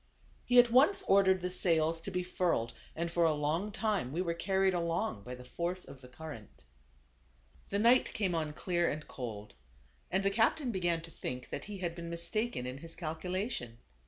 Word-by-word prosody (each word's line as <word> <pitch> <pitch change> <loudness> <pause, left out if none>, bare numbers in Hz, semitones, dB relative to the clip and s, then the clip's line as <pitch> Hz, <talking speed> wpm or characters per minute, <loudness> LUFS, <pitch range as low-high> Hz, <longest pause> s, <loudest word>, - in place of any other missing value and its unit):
He 245 - +3
at 240 -1 +8
once 285 +11 +5
ordered 190 -1 +4
the 180 0 -2
sails 165 -2 +2
to 180 - -5
be 180 -1 -1
furled, 175 -10 0 0.2
and 170 +1 -2
for 170 0 +2
a 160 -2 +4
long 155 +8 0
time 205 - -1
we 160 - -3
were 175 -2 0
carried 190 +2 +2
along 170 - -1
by 125 +4 -7
the 125 - -11
force 175 +7 -3
of 135 -1 -11
the 125 - -12
current. 125 - -10 1.1
The 200 - 0
night 235 +4 +5
came 195 -5 0
on 155 -2 -1
clear 175 +1 0
and 150 +1 -5
cold, 110 -4 -6 0.6
and 190 +2 +1
the 195 - +3
cap 225 +7 +3
tain 275 -6 -2
began 175 -4 0
to 165 0 -9
think 125 -4 -6
that - - -4
he 205 -1 -6
had 175 -3 -2
been 170 0 -7
mistaken 170 - -1
in 130 +2 -5
his 165 +2 -8
calculation. 170 - -3
170 Hz, 195 wpm, -33 LUFS, 155-195 Hz, 1.1 s, at